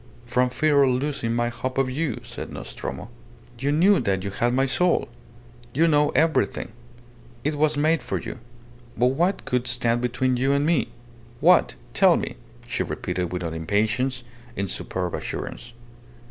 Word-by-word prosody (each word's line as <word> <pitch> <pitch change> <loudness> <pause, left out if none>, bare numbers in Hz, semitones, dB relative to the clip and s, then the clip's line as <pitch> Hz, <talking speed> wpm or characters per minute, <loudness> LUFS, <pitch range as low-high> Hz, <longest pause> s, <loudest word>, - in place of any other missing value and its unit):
"From 125 +1 +2
fear 140 +3 +3
of 135 - +5
losing 125 -3 -1
my 120 0 +1
hope 130 +2 -4
of 135 -1 +2
you," 135 -1 -2
said - - -7
Nostromo. - - -6 0.5
"You 140 +3 0
knew 185 +6 +5
that 95 -1 0
you 100 - -3
had 120 +4 +1
my 130 +2 +2
soul! 180 +6 +1 0.7
You 165 +4 +4
know 150 -2 +4
everything! 160 -7 +1 0.7
It 150 - 0
was 150 0 +1
made 155 +2 +2
for - - -3
you! 115 - -7 0.6
But 125 +3 +3
what 175 +7 0
could 125 -1 0
stand 120 -1 +1
between 125 +1 0
you 135 +3 +2
and 140 +1 +2
me? 165 0 +2 0.5
What? - - +5 0.2
Tell - - +5
me!" - - -4 0.3
she - - -2
repeated, 90 -1 -3
without 90 -2 -3
impatience, 110 +10 0 0.3
in 100 -2 -2
superb 90 0 -3
assurance. 120 - -5
125 Hz, 160 wpm, -24 LUFS, 115-145 Hz, 0.7 s, of